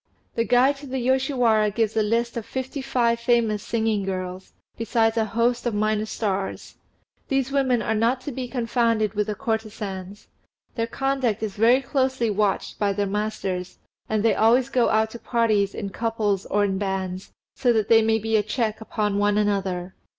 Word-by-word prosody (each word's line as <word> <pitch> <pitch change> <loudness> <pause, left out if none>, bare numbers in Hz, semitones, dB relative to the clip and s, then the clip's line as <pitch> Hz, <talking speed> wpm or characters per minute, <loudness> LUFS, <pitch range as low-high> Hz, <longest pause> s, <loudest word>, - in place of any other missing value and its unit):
The 230 - 0
Guide 260 +4 +4
to 285 0 -10
the 265 0 -3
Yoshiwara 250 -4 +2
gives 220 +1 -1
a 220 - +3
list 230 +3 0
of 235 - -3
fifty 260 +4 -5
five 235 -3 +1
famous 235 -3 +1
singing 220 -3 0
girls, 185 -1 -5 0.2
besides 225 0 +1
a 225 -1 +2
host 235 +2 0
of 230 - -1
minor 215 +1 0
stars. 195 -3 -3 0.5
These 270 -1 0
women 260 -4 +2
are - - 0
not 230 +4 +1
to 290 - -5
be 255 0 -4
confounded 230 -4 0
with 210 0 -1
the 210 - -2
courtesans. 210 -5 -4 0.5
Their 230 -2 -2
conduct 260 -4 -1
is 210 -3 -2
very 240 +5 +4
closely 260 -4 0
watched 205 -1 -1
by 200 -1 +1
their 205 +1 0
masters, 195 -3 -3 0.3
and 215 -1 0
they 230 - +4
always 240 +4 +3
go 250 -3 +2
out 220 0 +2
to 235 - -8
parties 215 -5 +1
in 200 -2 -4
couples 215 -4 -1
or 205 +1 +1
in 195 -1 0
bands, 190 -2 -3 0.2
so 245 - +2
that 220 -3 +1
they 225 -1 +6
may 220 0 +2
be 225 +1 -1
a - - +3
check 220 +1 -2
upon 210 -2 -1
one 205 0 +2
another. 190 -3 -1
220 Hz, 180 wpm, -24 LUFS, 205-240 Hz, 0.5 s, they